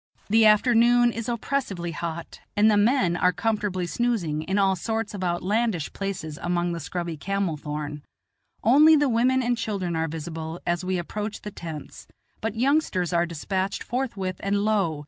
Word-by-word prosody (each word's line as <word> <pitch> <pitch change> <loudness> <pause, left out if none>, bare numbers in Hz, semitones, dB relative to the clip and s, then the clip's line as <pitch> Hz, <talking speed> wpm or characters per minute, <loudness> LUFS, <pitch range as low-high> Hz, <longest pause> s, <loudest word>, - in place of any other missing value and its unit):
The 220 0 +6
afternoon 240 +2 +5
is 230 +1 -4
oppressively 230 -8 -2
hot, 165 +1 -6 0.2
and 215 +1 +5
the - - +4
men 205 -4 +3
are 180 +1 +3
comfortably 200 0 -1
snoozing 180 -8 -1
in 190 +5 -2
all 195 -1 +3
sorts 220 +3 -3
of 195 -2 -5
outlandish 185 +1 0
places 185 -6 -4
among 175 0 0
the 170 - -3
scrubby 170 +1 -4
camel 195 +1 -1
thorn. 150 0 -5 0.6
Only 300 +7 +7
the 290 -1 +3
I - - +1
women 255 +3 +2
and 240 0 +1
children 200 -7 -2
are 160 0 0
visible 160 +1 -6
as 175 0 0
we 185 0 -1
approach 210 +5 -4
the 210 - -6
tents; 160 -5 -8 0.3
but 220 0 -2
youngsters 235 - +1
are 170 0 +2
despatched 190 +4 -2
forthwith, 205 -8 -3
and, 200 +1 0
lo! 195 -8 +1
195 Hz, 165 wpm, -25 LUFS, 170-225 Hz, 0.6 s, Only